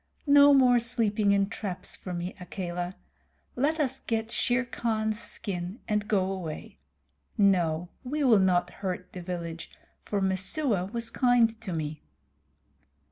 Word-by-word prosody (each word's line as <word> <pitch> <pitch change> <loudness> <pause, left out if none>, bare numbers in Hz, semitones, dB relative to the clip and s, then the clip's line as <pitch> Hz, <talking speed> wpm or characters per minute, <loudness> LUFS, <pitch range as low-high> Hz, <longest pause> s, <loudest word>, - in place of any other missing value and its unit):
"No 285 0 +7
more 255 -3 +6
sleeping 225 -3 +1
in 200 0 +3
traps 200 -3 -4
for 185 - -8
me, 175 +1 -4
Akela. 180 0 -4 0.6
Let 295 +6 +1
us 270 -3 0
get 225 0 -2
Shere 245 +1 +1
Khan's 220 -2 -1
skin 190 -2 -5
and 210 -1 0
go 190 -3 +1
away. 175 -5 -6 0.6
No, 175 -5 +2 0.2
we 290 +4 -2
will 235 -6 +6
not 180 -2 +2
hurt 180 -2 -4
the 180 - -6
village, 170 -2 -5 0.3
for 205 - -2
Messua 190 +3 +1
was 230 -1 -3
kind 235 -3 +3
to 210 -5 -5
me." 155 -2 -4
205 Hz, 135 wpm, -28 LUFS, 180-235 Hz, 0.6 s, No